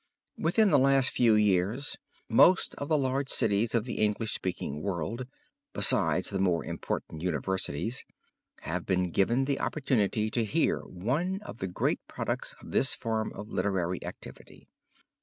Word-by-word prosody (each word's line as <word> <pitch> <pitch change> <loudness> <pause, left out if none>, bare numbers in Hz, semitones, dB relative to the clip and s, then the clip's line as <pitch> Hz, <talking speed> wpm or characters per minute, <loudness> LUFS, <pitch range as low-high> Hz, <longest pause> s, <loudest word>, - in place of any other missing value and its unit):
Within 200 +5 +3
the - - +6
last 135 -1 +4
few 115 -3 +4
years 105 +6 +1 0.3
most 175 +11 +5
of 140 - -4
the 155 - +4
large 135 0 -1
cities 110 +3 +1
of 115 -1 +1
the 120 - -4
English 105 +1 +1
speaking 75 -5 -3
world, 100 +7 -3 0.5
besides - - +2
the 100 - -2
more 90 -3 +1
important 80 - -4
universities, 90 - -2 0.6
have 90 +2 -3
been 90 -2 0
given 120 +10 +2
the 140 0 -1
opportunity 110 -7 0
to 115 - 0
hear 105 - +1
one 150 - -2
of 165 - -9
the 95 - -2
great 90 - 0
products - - -3
of - - -11
this - - +3
form 110 -1 -2
of 105 +2 -8
literary 90 -3 -1
activity. - - -10
110 Hz, 150 wpm, -29 LUFS, 95-130 Hz, 0.6 s, the